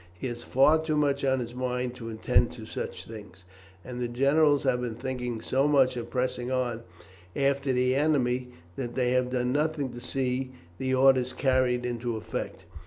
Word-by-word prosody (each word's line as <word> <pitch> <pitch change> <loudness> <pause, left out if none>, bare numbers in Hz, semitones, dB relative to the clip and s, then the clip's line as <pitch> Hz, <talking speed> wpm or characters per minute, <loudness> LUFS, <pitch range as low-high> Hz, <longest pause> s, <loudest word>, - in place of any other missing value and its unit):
He - - -5
has 120 0 -6
far 150 +6 +4
too 155 -1 -1
much 140 -2 +1
on 130 -1 +2
his 120 0 -6
mind 125 0 -2
to 115 -2 -7
attend 110 -1 +2
to - - -9
such - - -6
things, 105 -5 -11 0.4
and 125 -1 -6
the 120 - 0
generals 140 +4 +3
have 130 -2 +1
been 120 -2 -3
thinking 125 -2 -4
so 135 +5 +1
much 135 -3 +4
of 120 -1 -5
pressing 125 -1 -2
on 125 -3 -1 0.5
after 140 0 +1
the 125 0 +2
enemy 130 -4 +1 0.3
that 120 -2 -4
they 125 -1 +1
have 125 0 +2
done 125 -1 0
nothing 145 -2 0
to 120 - -8
see 130 0 -2 0.3
the 130 0 -1
orders 130 -1 +4
carried 130 -2 +1
into 120 -1 -2
effect. 110 - -5
125 Hz, 180 wpm, -28 LUFS, 120-135 Hz, 0.5 s, far